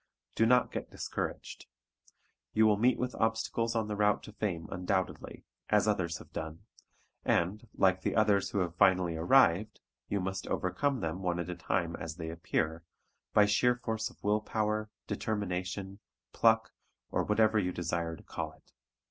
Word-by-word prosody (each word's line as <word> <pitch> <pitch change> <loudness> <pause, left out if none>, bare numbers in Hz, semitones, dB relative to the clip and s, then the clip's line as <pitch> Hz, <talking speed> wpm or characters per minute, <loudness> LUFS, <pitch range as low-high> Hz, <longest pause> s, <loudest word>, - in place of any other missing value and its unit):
Do 115 - +3
not 125 +1 +4
get - - -5
discouraged. - - -5 0.9
You 110 0 +5
will 105 -1 +5
meet 120 +5 +3
with 125 0 -2
obstacles 115 +1 0
on 110 -2 0
the 105 - -3
route 105 0 +2
to 105 - -10
fame 90 -7 -3
undoubtedly, 90 0 -2 0.3
as 105 0 +3
others 90 -5 0
have - - -15
done, 80 0 -6 0.6
and, 100 +7 0
like 95 -1 +3
the - - -1
others 105 -3 +3
who - - -3
have 85 -2 -2
finally 90 -2 +3
arrived, 105 +2 +4 0.3
you 100 - -1
must 95 +1 -3
overcome 135 +8 0
them 80 +2 -3
one 90 -2 0
at 85 +1 -3
a - - -4
time 85 -2 -1
as 80 -1 -6
they 80 -2 -5
appear, 85 -1 -1 0.5
by 105 - +6
sheer 120 +4 +3
force 110 -3 -3
of - - -21
willpower, 105 +1 0 0.2
determination, 95 -1 -3 0.3
pluck 115 -1 +3 0.4
or - - +1
whatever 110 0 +3
you 90 -2 0
desire 85 -1 -2
to - - -15
call - - -5
it. - - -25
100 Hz, 165 wpm, -31 LUFS, 90-110 Hz, 0.9 s, by